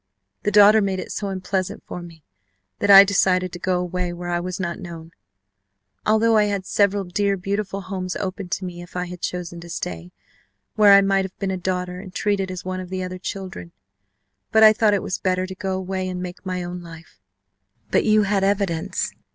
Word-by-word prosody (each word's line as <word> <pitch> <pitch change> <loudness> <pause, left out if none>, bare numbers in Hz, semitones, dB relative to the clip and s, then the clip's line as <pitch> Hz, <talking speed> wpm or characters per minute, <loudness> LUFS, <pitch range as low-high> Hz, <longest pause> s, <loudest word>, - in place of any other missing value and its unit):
The - - 0
daughter 210 +1 +7
made 195 -2 -1
it - - -6
so 205 - -3
unpleasant 190 -1 -3
for 180 - -7
me 165 -3 -13 0.6
that 205 - 0
I 195 0 +11
decided 185 -2 +2
to 175 - -6
go 180 0 0
away 180 0 -2
where 175 0 -6
I 175 0 0
was 180 +1 -5
not 170 -2 -3
known, 170 -3 -9 1.0
although 220 +1 +4
I 210 - +4
had 200 -2 -2
several 200 0 +2
dear 200 +2 0
beautiful 200 +1 -3
homes 185 -1 -4
opened 190 -1 -5
to 190 - -3
me 175 -1 -7
if 175 - -13
I 180 0 -1
had 180 0 -9
chosen 175 -1 -4
to 170 - -11
stay, 90 - -5 0.6
where 205 -2 +7
I 200 - +8
might 195 0 +2
have 190 - -10
been 195 -1 -2
a - - -1
daughter 180 0 -3
and 190 0 -10
treated 195 0 -1
as 185 -1 -6
one 185 0 -3
of 185 -1 -7
the 185 0 -3
other 185 0 -6
children. 185 - -7 0.8
But 220 0 +5
I 215 0 +9
thought 215 -1 +3
it 200 - -2
was - - -3
better 185 0 0
to 190 - -7
go 190 -1 -3
away 190 0 -3
and 180 -1 -4
make 180 0 -7
my 180 -1 -2
own 175 0 -6
life 165 - -13 0.3
" 100 +3 -42
"But - - +3
you 215 -1 +4
had 200 -1 +1
evidence. 195 -5 -1
185 Hz, 215 wpm, -22 LUFS, 180-200 Hz, 1.0 s, I